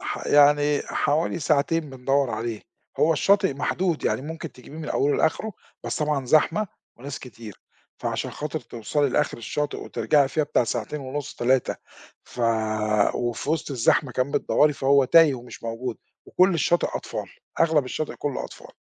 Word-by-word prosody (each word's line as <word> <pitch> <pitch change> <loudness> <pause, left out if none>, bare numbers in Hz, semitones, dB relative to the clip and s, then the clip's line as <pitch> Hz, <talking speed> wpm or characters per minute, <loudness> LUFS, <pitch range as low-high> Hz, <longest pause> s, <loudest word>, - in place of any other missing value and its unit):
ح - - -5
يعني 145 0 +4
حوالي 160 +4 0
ساعتين 155 0 +1
بندوّر 135 0 0
عليه. 115 0 -4 0.4
هو 165 - +4
الشاطئ 190 -1 +3
محدود، 165 +4 -1
يعني - - 0
ممكن 160 +2 -7
تجيبيه 130 +4 -13
من 155 - -6
أوله 145 +1 +1
لآخرُه، 210 +7 0 0.3
بس - - -2
طبعًا 150 -3 0
زحمة 160 +9 +3 0.3
وناس 140 +3 -7
كتير، 115 -5 -11 0.4
فعشان - - -3
خاطر 155 +1 -4
تِوصلي 120 +5 -1
لآخِر 125 - 0
الشاطئ 145 +6 -3
وترجعي 145 -3 +1
فيها 155 +3 0
بتاع 145 -4 +1
ساعتين 120 +6 -3
ونُصّ 140 +2 -5
3، 125 +1 +1 0.5
ف - - -9 0.7
وفي 120 +3 -2
وسط 160 -1 -1
الزحمة 130 +1 +2
كمان 130 +3 -1
بتدَوّرِي، 150 0 +3
فهو 140 0 +3
تايه 155 +2 +6
ومش 125 -1 -10
موجود، 115 +1 -4 0.3
وكُلّ 185 0 +3
الشاطئ 170 +2 +2
أطفال، - - -5 0.3
أغلب 160 -4 +3
الشاطئ 150 +4 -4
كُلّه 145 -3 -3
أطفال. - - -11
145 Hz, 155 wpm, -24 LUFS, 125-155 Hz, 0.7 s, تايه